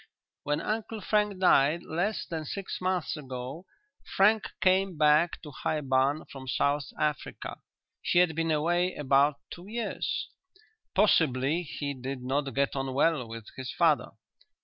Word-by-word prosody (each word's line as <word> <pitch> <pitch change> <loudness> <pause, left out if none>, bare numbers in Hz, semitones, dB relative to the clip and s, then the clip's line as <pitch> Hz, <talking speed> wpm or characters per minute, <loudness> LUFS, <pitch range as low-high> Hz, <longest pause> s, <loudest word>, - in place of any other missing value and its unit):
"When 145 0 -1
Uncle 220 +1 -3
Frank 210 -1 +1
died, 165 -3 +4
less 180 +7 -2
than 165 -2 -4
six 190 +6 -5
months 185 -2 -1
ago, 135 +4 -7 0.5
Frank 210 +2 +5
came 185 -1 +2
back 150 +3 +4
to 150 - -8
High 155 +2 -2
Barn 135 +2 +1
from 135 -1 -9
South 140 +2 +1
Africa. 150 -2 -3 0.4
He - - 0
had 175 -2 +5
been 165 0 0
away 175 +4 +1
about 140 0 +3 0.2
two 175 +2 -9
years." 230 +2 -3 0.7
"Possibly 160 -6 +3
he 145 -3 -4
did 130 0 -6
not 135 +2 -1
get 140 0 +1
on 135 -1 -2
well 145 -4 +2
with 115 -1 -8
his 130 -1 -5
father?" - - +2
155 Hz, 145 wpm, -29 LUFS, 135-180 Hz, 0.7 s, Frank